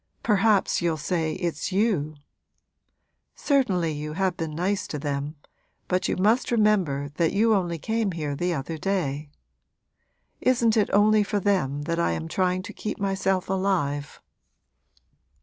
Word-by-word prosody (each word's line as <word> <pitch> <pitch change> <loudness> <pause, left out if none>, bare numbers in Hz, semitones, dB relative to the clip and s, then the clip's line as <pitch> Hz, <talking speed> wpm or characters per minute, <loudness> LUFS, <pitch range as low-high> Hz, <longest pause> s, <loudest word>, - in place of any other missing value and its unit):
Perhaps 210 -2 +3
you'll 170 -2 0
say 160 +1 -1
it's 170 -1 -3
you! 185 -7 +1 1.2
Certainly 195 - +1
you 150 0 -5
have 185 +1 0
been 160 -3 -4
nice 190 +4 -1
to 150 - -4
them, 145 +1 -3 0.5
but 185 0 0
you - - -1
must 215 +7 +2
remember 195 - +2
that 165 -2 +2
you 220 +3 +3
only 175 -4 0
came 220 +3 -1
here 150 -3 -3
the 175 +5 -1
other 160 +1 -4
day. 150 -6 -2 1.1
Isn't 235 -3 +2
it 215 -2 +2
only 210 +1 +5
for 205 0 0
them 150 -8 0
that 165 +2 -2
I 170 - +1
am 160 - -4
trying 185 +2 0
to 205 +1 -8
keep 215 - -5
myself 195 -1 0
alive?' 180 -7 -1
180 Hz, 145 wpm, -25 LUFS, 155-205 Hz, 1.2 s, only